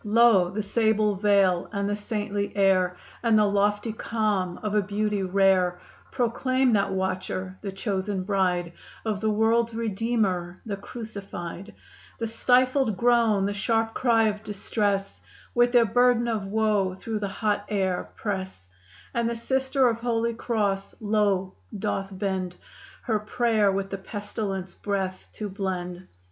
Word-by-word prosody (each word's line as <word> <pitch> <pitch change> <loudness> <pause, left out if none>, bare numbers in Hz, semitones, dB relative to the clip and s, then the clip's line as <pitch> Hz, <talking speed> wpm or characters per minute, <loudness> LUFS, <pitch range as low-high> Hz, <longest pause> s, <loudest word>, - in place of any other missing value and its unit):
Lo! 215 -4 +5
the 210 +3 -3
sable 215 0 +2
veil 195 -3 +2
and 200 -1 -1
the 205 - 0
saintly 205 -1 -3
air, 185 -2 +3 0.2
And 230 -2 +4
the 210 - +5
lofty 205 +2 +1
calm 210 -6 -1
of 210 -1 -2
a 210 - +4
beauty 205 +1 -1
rare, 185 -1 +3 0.3
Proclaim 255 +1 +1
that 200 -2 +2
watcher, 190 0 -2
the 200 - -4
chosen 195 -1 -2
bride, 180 -3 0 0.3
Of 210 -3 -1
the 220 - +1
world's 225 +2 +2
Redeemer 205 -5 -1
the 210 -3 -3
Crucified 200 -4 -8 0.4
The 230 - -2
stifled 250 0 +2
groan, 235 -4 +3
the 200 - -1
sharp 225 +2 0
cry 230 -3 +3
of 210 0 -3
distress 205 -1 -2 0.3
With 240 0 +4
their 240 -2 +5
burden 240 +2 +3
of 215 -4 -1
woe, 205 -3 +1
through 220 +3 -4
the 205 - -2
hot 205 +1 -1
air 190 -3 -1
press, 190 - -4 0.5
And 235 -1 +1
the 235 - -2
Sister 265 +2 +1
of 230 -1 0
Holy 230 -1 0
Cross 205 -4 -1
low 205 -3 +1 0.2
doth 195 0 -2
bend; 185 -2 -2 0.5
Her 220 -4 0
prayer 215 -1 +2
with 195 0 -2
the 195 - -3
pestilence 195 -2 -5
breath 190 -2 -3
to 210 - -4
blend. 185 -2 -4
205 Hz, 145 wpm, -26 LUFS, 195-225 Hz, 0.5 s, Lo